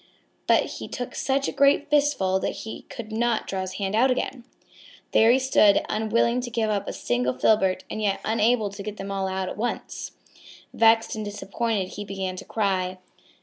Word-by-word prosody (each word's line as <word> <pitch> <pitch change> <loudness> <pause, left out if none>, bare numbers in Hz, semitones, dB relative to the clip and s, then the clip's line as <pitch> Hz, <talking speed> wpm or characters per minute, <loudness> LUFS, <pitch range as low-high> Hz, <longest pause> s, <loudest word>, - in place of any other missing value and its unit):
But - - +4
he - - -7
took 245 - -5
such 275 0 0
a - - -1
great 280 +1 +3
fistful 285 -11 +2
that - - -2
he 220 - -8
could 220 -2 -8
not 230 0 0
draw 190 -1 -3
his 185 0 -5
hand 195 0 -3
out 240 +5 +4
again. 250 -1 -2 0.7
There 225 - +5
he 245 - +6
stood, 255 -6 +4
unwilling 230 +3 +1
to 245 - -5
give 225 -2 0
up 200 -2 -2
a - - -2
single 125 +1 -1
filbert 190 +2 +2
and 215 - -5
yet 200 -2 0
unable 220 -1 +2
to 200 0 -8
get 210 +1 -6
them 195 0 -6
all 195 -1 -1
out 190 0 -2
at - - -6
once. 240 +3 -4 0.6
Vexed 225 0 +4
and 215 - -4
disappointed 205 -1 -2
he 205 - -6
began 190 -2 -4
to - - -8
cry. 185 -4 -1
215 Hz, 190 wpm, -25 LUFS, 195-235 Hz, 0.7 s, he